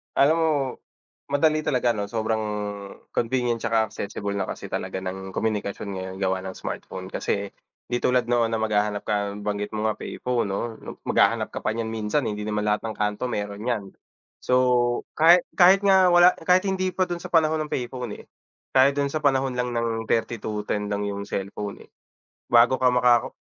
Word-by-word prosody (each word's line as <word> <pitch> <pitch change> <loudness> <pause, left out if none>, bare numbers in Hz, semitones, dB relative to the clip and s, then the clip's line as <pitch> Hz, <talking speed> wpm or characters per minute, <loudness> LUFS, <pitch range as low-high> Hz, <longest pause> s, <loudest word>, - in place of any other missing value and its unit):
Alam 145 +4 +5
mo 160 -1 +2 0.8
madali 155 +2 +2
talaga 125 -5 +1
ano, 105 -3 -3
sobrang 110 0 -1 0.7
convenient 120 0 0
tsaka 115 -1 0
accessible 100 0 -4
na 95 - -2
kasi - - -7
talaga 95 - -3
ng 95 0 -6
komunikasyon 105 -2 -2
ngayon 95 -1 -5
gawa 95 -1 +1
ng 95 - -6
smartphone. 95 0 -7
Kasi 100 0 -2 0.4
di 120 - 0
tulad 125 -1 +1
noon 120 -1 +3
na 115 - 0
maghahanap 105 -1 0
ka, 100 -1 -1
nabanggit 105 0 -3
mo 110 +1 0
nga, 105 - -3
payphone, 125 -4 -2
'no, 100 0 -2 0.4
maghahanap - - +2
ka - - -5
pa 110 - -1
niyan 115 -1 -3
minsan, 110 +6 -1
eh, - - -1
hindi 105 0 -5
naman 105 -1 -1
lahat 105 +2 0
ng 110 - -5
kanto 105 +4 -1
meron 105 -3 -4
niyan. 115 -5 -1 0.5
So, - - -2 0.6
kahit 170 +3 +7
kahit 190 +2 +7
nga 190 -2 +6
wala 175 +1 +8
kahit 180 +2 +4
hindi 185 -1 -1
pa 185 - +2
dun 175 -1 -3
sa - - -7
panahon 160 -1 +3
ng - - -24
payphone, 125 -3 -4
eh, - - -26 0.5
kahit 135 +1 +5
dun 140 0 0
sa 155 - -1
panahon 135 -1 +2
lang 125 0 -1
ng 115 -1 -1
3210 105 -2 -2
lang 105 0 -2
yung 100 0 -4
cellphone, 100 +1 -5
eh. - - -23 0.6
Bago 120 +2 +6
ka 130 - +4
maka 125 -1 +4
115 Hz, 180 wpm, -24 LUFS, 105-130 Hz, 0.8 s, wala